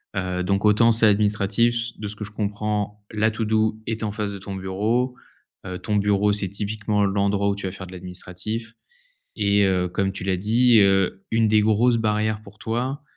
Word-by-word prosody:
heu, 90 Hz, -1 st, -2 dB
donc 100 Hz, +2 st, 0 dB
autant 110 Hz, +2 st, +5 dB
ça, 115 Hz, -1 st, +4 dB
l'administratif, 105 Hz, +3 st, +1 dB
de 105 Hz, -, -5 dB
ce 105 Hz, -, -5 dB
que 105 Hz, -, -7 dB
je 105 Hz, -, -7 dB
comprends, 105 Hz, 0 st, -3 dB
la 110 Hz, +1 st, +1 dB
to-do 110 Hz, 0 st, 0 dB
est 110 Hz, -1 st, -3 dB
en 105 Hz, -, -1 dB
face 105 Hz, -1 st, -3 dB
de -, -, -6 dB
ton 100 Hz, 0 st, -7 dB
bureau, 110 Hz, +7 st, -1 dB, 0.5 s
heu, 90 Hz, -1 st, -5 dB
ton 105 Hz, -2 st, -2 dB
bureau, 105 Hz, 0 st, +2 dB
c'est 100 Hz, -2 st, -2 dB
typiquement 105 Hz, +1 st, -1 dB
l'endroit 100 Hz, 0 st, +1 dB
où 100 Hz, -, 0 dB
tu 100 Hz, -, -6 dB
vas 95 Hz, -, -2 dB
faire 95 Hz, -1 st, -9 dB
de 95 Hz, -, -11 dB
l'administratif 90 Hz, +5 st, -6 dB, 0.6 s
et 100 Hz, -1 st, +3 dB
heu, 90 Hz, -1 st, +1 dB
comme 95 Hz, +2 st, -1 dB
tu 95 Hz, -, -7 dB
l'as 95 Hz, -2 st, 0 dB
dit, 115 Hz, +4 st, +4 dB
heu, 95 Hz, -1 st, +2 dB
une 115 Hz, -1 st, +3 dB
des 105 Hz, 0 st, +4 dB
grosses 115 Hz, +3 st, +3 dB
barrières 110 Hz, -1 st, 0 dB
pour 105 Hz, 0 st, -15 dB
toi, 125 Hz, +6 st, -3 dB
105 Hz, 195 wpm, -23 LUFS, 100-110 Hz, 0.6 s, autant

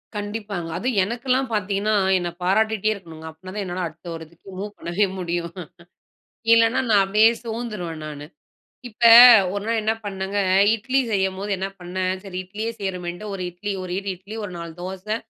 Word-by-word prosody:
கண்டிப்பாங்க 205 Hz, -4 st, -4 dB
அதும் 240 Hz, +1 st, -1 dB
எனக்கெல்லாம் 250 Hz, +4 st, -1 dB
பாத்தீங்கன்னா, 205 Hz, +1 st, 0 dB, 0.2 s
என்ன 175 Hz, -1 st, -2 dB
பாராட்டிகிட்டே 215 Hz, +2 st, +2 dB
இருக்கணுங்க. 165 Hz, -5 st, -11 dB
அப்படினா 185 Hz, +4 st, -11 dB
தான் 205 Hz, -, -2 dB
என்னால 180 Hz, 0 st, -3 dB
அடுத்த 165 Hz, +3 st, -14 dB
ஒரு 165 Hz, -, -7 dB
இதுக்கு 170 Hz, +4 st, -18 dB
மூவ் 205 Hz, +1 st, -6 dB
பண்ணவே 175 Hz, +5 st, 0 dB
முடியும். 170 Hz, -1 st, -3 dB, 1.0 s
இல்லனா 230 Hz, +2 st, +4 dB
நான் 200 Hz, -2 st, +5 dB
அப்படியே 210 Hz, +3 st, +5 dB
சோந்துடுவேன் 210 Hz, -9 st, -5 dB
நானு. 145 Hz, -1 st, -7 dB, 0.6 s
இப்ப 230 Hz, +1 st, -3 dB, 0.5 s
ஒரு 200 Hz, 0 st, -3 dB
நாள் 230 Hz, -1 st, +1 dB
என்ன 220 Hz, +1 st, +2 dB
பண்ணேங்க, 195 Hz, 0 st, -3 dB, 0.4 s
இட்லி 255 Hz, +5 st, 0 dB
செய்யும்போது 190 Hz, +1 st, -1 dB
என்ன 195 Hz, +1 st, -2 dB
பண்ணேன் 185 Hz, +1 st, -2 dB
சரி 185 Hz, -2 st, -6 dB
இட்லியே 215 Hz, +5 st, -4 dB
செய்றோமேட்டு 180 Hz, 0 st, -4 dB
ஒரு 185 Hz, -, -5 dB
இட்லி, 200 Hz, +4 st, -5 dB
ஒரு 180 Hz, -1 st, -6 dB
இடு 200 Hz, 0 st, -5 dB
இட்லி 200 Hz, +5 st, -10 dB
ஒரு 185 Hz, -, -6 dB
4 170 Hz, -1 st, -7 dB
தோசை, 190 Hz, +4 st, -4 dB
195 Hz, 160 wpm, -23 LUFS, 180-215 Hz, 1.0 s, நான்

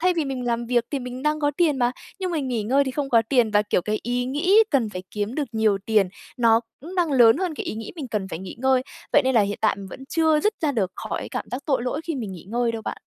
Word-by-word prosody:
thay 365 Hz, +2 st, +3 dB
vì 320 Hz, -, +1 dB
mình 265 Hz, -2 st, -3 dB
làm 235 Hz, 0 st, -1 dB
việc 240 Hz, -1 st, +2 dB
thì 285 Hz, -, -1 dB
mình 250 Hz, 0 st, -7 dB
đang 300 Hz, +1 st, +1 dB
có 290 Hz, -1 st, +2 dB
tiền 320 Hz, -5 st, +3 dB
mà, 245 Hz, -1 st, +2 dB, 0.3 s
nhưng 370 Hz, -1 st, -1 dB
mình 300 Hz, -6 st, -2 dB
nghỉ 235 Hz, -4 st, -1 dB
ngơi 270 Hz, +6 st, +3 dB
thì 265 Hz, -, -2 dB
không 275 Hz, +1 st, -2 dB
có 230 Hz, -2 st, +5 dB
tiền 245 Hz, -5 st, +3 dB
và, 210 Hz, 0 st, +4 dB
kiểu, 205 Hz, -3 st, 0 dB
cái 215 Hz, +3 st, -1 dB
ý 245 Hz, +1 st, -1 dB
nghĩ 325 Hz, +11 st, +3 dB
cần 255 Hz, -7 st, +2 dB
phải 185 Hz, -2 st, -6 dB
kiếm 210 Hz, +3 st, -3 dB
được 290 Hz, -2 st, -2 dB
nhiều 220 Hz, -3 st, +2 dB
tiền, 215 Hz, -4 st, +3 dB, 0.3 s
nó 230 Hz, -1 st, +5 dB, 0.2 s
cũng 335 Hz, +7 st, -9 dB
đang 345 Hz, -5 st, +1 dB
lớn 235 Hz, -3 st, +6 dB
hơn 355 Hz, -1 st, -2 dB
cái -, -, -5 dB
ý -, -, -3 dB
nghĩ 220 Hz, -1 st, -6 dB
mình 285 Hz, -6 st, -5 dB
cần 205 Hz, -4 st, -2 dB
phải 160 Hz, -, -5 dB
nghỉ 190 Hz, +2 st, -8 dB
ngơi. 260 Hz, 0 st, +3 dB, 0.3 s
Vậy 290 Hz, -, +6 dB
nên 260 Hz, -, +2 dB
là 230 Hz, -, +6 dB
hiện 205 Hz, 0 st, -1 dB
tại 215 Hz, -, +2 dB
mình 200 Hz, -1 st, -8 dB
vẫn 265 Hz, -, -10 dB
chưa 320 Hz, -2 st, +3 dB
dứt 425 Hz, +6 st, +1 dB
ra 305 Hz, -4 st, +1 dB
được 195 Hz, -7 st, -1 dB, 0.2 s
khỏi -, -, -3 dB
cảm -, -, -3 dB
giác 255 Hz, +3 st, -4 dB
tội 270 Hz, -5 st, +1 dB
lỗi 255 Hz, +4 st, -2 dB
khi 330 Hz, -, -2 dB
mình 225 Hz, -8 st, -4 dB
nghỉ 175 Hz, -, -10 dB
ngơi 235 Hz, 0 st, +1 dB
đâu 225 Hz, -1 st, -5 dB
bạn. -, -, -5 dB
250 Hz, 295 wpm, -24 LUFS, 220-290 Hz, 0.3 s, lớn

